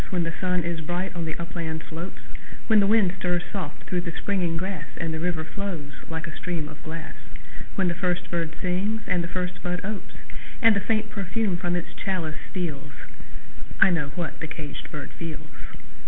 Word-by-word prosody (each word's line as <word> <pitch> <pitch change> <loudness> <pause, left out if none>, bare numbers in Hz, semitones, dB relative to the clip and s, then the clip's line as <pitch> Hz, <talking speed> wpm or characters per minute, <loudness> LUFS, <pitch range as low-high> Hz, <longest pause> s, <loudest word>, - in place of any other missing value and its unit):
When 180 -2 +2
the 165 0 -1
sun 180 -1 +3
is 170 -1 -1
bright 175 +4 -1
on 170 -1 0
the 160 - -2
upland 165 -1 -2
slopes; 170 +3 -5 0.4
When 220 -2 +7
the 200 - +6
wind 205 -4 +6
stirs 175 -1 +2
soft 160 -7 -3
through 180 -1 +1
the 170 - -2
springing 175 -2 +1
grass, 185 -2 -2
And 165 0 0
the 160 - -1
river 170 -1 +1
flows 160 -2 -3 0.2
like 160 -1 -1
a 155 - -6
stream 170 -4 -1
of 155 -1 -10
glass; 160 0 -5 0.6
When 190 -2 +3
the 170 - +3
first 180 0 0
bird 165 -2 0
sings 195 +5 +1
and 180 -2 +3
the - - -1
first 180 +1 -2
bud 180 0 0
opes, 210 -1 -4 0.4
And 225 -3 +8
the - - +4
faint 215 +1 +1
perfume 200 0 +1
from 175 0 +1
its 175 - -2
chalice 165 -5 -1
steals 150 -6 -2 0.9
I 190 - +9
know 165 -5 +2
what 175 -3 -2
the 165 - -2
caged 155 -1 -5
bird 150 -2 -5
feels! 155 -2 -7
175 Hz, 195 wpm, -28 LUFS, 160-185 Hz, 0.9 s, I